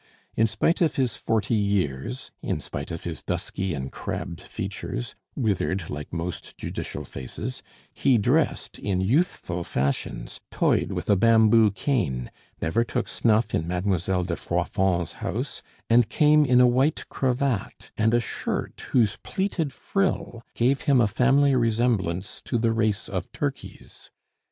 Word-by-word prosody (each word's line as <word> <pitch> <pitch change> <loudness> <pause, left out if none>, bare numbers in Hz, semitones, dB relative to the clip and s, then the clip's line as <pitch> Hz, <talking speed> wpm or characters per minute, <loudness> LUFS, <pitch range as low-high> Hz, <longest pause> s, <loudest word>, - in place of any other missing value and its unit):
In 115 - +4
spite 165 +11 +1
of 165 - +3
his 125 -5 +1
forty 110 0 0
years, 90 - -1
in - - -2
spite 70 - -6
of 85 -1 -5
his 85 -2 -4
dusky 95 0 -3
and 65 -1 -5
crabbed 85 - -5
features, - - -5 0.2
withered 95 - -1
like 75 0 -6
most 85 +1 -5
judicial - - -5
faces, 105 - -6 0.3
he 130 -3 +3
dressed 105 - +1
in 95 -3 -1
youthful 95 - 0
fashions, 70 -4 -2
toyed - - +1
with - - -4
a 100 - +5
bamboo 110 +1 +5
cane, 95 - -1 0.3
never 95 +9 +1
took 120 - -2
snuff 110 -1 +2
in 80 - 0
Mademoiselle 90 0 0
de 85 -1 -2
Froidfond's 85 0 0
house, - - -3 0.3
and 115 -1 +4
came 150 +2 +5
in 125 -2 +5
a 125 - +8
white 130 +5 +2
cravat 130 -4 -1
and 110 +2 +3
a - - +5
shirt 120 - -4
whose 115 -6 +3
pleated 190 -7 -1
frill 190 - -1
gave 130 +4 +2
him 135 -3 +6
a 120 - +5
family 135 +6 +3
resemblance 110 -6 0
to - - -1
the 115 0 +2
race 110 -2 0
of - - -4
turkeys. - - -6
110 Hz, 145 wpm, -25 LUFS, 90-125 Hz, 0.3 s, a